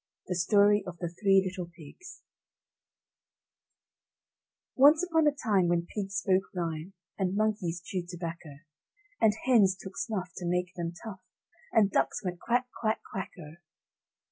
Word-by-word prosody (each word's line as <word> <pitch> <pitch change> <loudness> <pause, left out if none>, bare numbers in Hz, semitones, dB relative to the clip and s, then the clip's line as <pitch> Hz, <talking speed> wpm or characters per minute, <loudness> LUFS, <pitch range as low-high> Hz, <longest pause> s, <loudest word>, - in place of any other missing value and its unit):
THE 180 - -2
STORY 205 +3 +4
OF 175 -1 -7
THE 175 -1 -3
THREE 195 +2 +3
LITTLE 180 -2 -6
PIGS 170 - -12 2.5
Once 295 +5 +6
upon 325 -3 +2
a - - +5
time 210 -10 +1
when 170 0 +1
pigs 195 -2 -4
spoke 190 0 +2
rhyme 165 +1 -3 0.3
And 190 0 0
monkeys 200 -6 -1
chewed 180 -4 -4
tobacco, 165 -4 -7 0.6
And 220 -2 +5
hens 205 -7 +4
took 190 0 -9
snuff 190 -6 -3
to 175 - -4
make 180 0 -1
them 170 -1 -4
tough, 205 -5 -8 0.5
And 205 -3 +4
ducks - - 0
went 180 -2 -4
quack, 245 +3 +1 0.2
quack, 220 -1 0
quack, 190 - -3
O! 155 0 -11
190 Hz, 145 wpm, -29 LUFS, 175-215 Hz, 2.5 s, Once